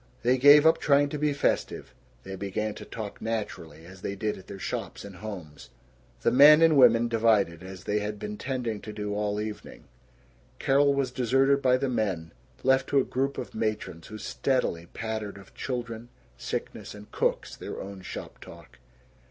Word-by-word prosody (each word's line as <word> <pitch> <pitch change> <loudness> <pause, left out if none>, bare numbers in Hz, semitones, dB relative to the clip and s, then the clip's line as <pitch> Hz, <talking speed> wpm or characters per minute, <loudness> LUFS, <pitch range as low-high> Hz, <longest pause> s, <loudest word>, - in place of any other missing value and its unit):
They 125 +2 +3
gave 145 +3 +8
up 160 +1 +5
trying 145 0 +3
to 150 - -4
be 150 0 +2
festive; 145 - -1 0.3
they 95 0 -7
began 100 +2 -3
to - - -10
talk 105 -3 -7
naturally, 85 -8 -5
as 95 +1 -13
they 100 - -4
did 105 +1 -2
at 95 - -14
their 100 - -8
shops 95 - -5
and 100 -3 -10
homes. 90 -8 -9 0.5
The - - +2
men 150 +4 +8
and 165 -2 +5
women 120 -3 +6
divided, 110 -7 +2
as 95 0 -9
they 105 +1 0
had 105 0 -4
been 210 - -5
tending 125 - -3
to 105 - -7
do 105 -1 -4
all 105 0 -1
evening. 105 0 -7 0.7
Carol 140 +1 +3
was 135 -2 0
deserted 135 +3 +2
by 130 -1 +4
the 135 - -1
men, 100 -9 -2 0.3
left 130 0 +3
to 140 - +4
a - - +3
group 135 +2 -2
of - - -6
matrons 110 -7 -3
who 110 - -8
steadily 105 -9 -1
pattered 110 0 -5
of 100 -1 -15
children, 120 -2 -5 0.3
sickness, 65 - -5
and 105 0 -13
cooks - - -1
their - - -7
own 100 0 -8
shop - - -8
talk. - - -14
110 Hz, 180 wpm, -27 LUFS, 100-135 Hz, 0.7 s, gave